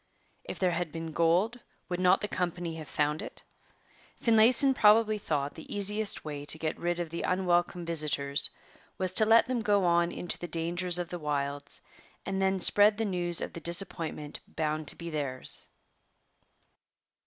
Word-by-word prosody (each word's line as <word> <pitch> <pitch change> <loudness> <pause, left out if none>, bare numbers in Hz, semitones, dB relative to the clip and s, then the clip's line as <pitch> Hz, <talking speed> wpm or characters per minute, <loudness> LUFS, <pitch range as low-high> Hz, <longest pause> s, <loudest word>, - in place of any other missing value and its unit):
If - - -6
there 185 -2 +1
had 170 -1 -3
been 165 0 -6
gold, 175 +9 +1 0.3
would 180 -1 -4
not 185 0 +3
the 210 - -3
company 175 -3 -3
have 155 - -9
found 150 +1 -1
it? - - -10 0.8
Finlayson 235 +4 +4
probably 215 -2 +4
thought 145 -6 -2
the 160 - -12
easiest 205 0 +1
way 145 -2 -6
to 145 +2 +4
get 155 -1 -4
rid 175 0 -2
of 170 -2 -4
the 170 - -4
unwelcome 175 -1 0
visitors 150 -4 -1 0.5
was 185 -1 -2
to 215 +2 +3
let 225 +1 +5
them 245 -1 -2
go 205 -3 +1
on 170 0 +2
into 175 - -3
the 175 - -6
dangers 175 +2 +3
of 175 -1 -4
the 175 - -6
wilds 145 -1 -3 0.4
and 195 0 -3
then 190 0 +1
spread 205 +3 +5
the 225 - -1
news 175 -3 +1
of - - -5
the 170 - -8
disappointment 165 -3 -1
bound 155 -1 -3
to - - +3
be 170 0 -8
theirs. 140 -4 +1
175 Hz, 170 wpm, -29 LUFS, 155-195 Hz, 0.8 s, let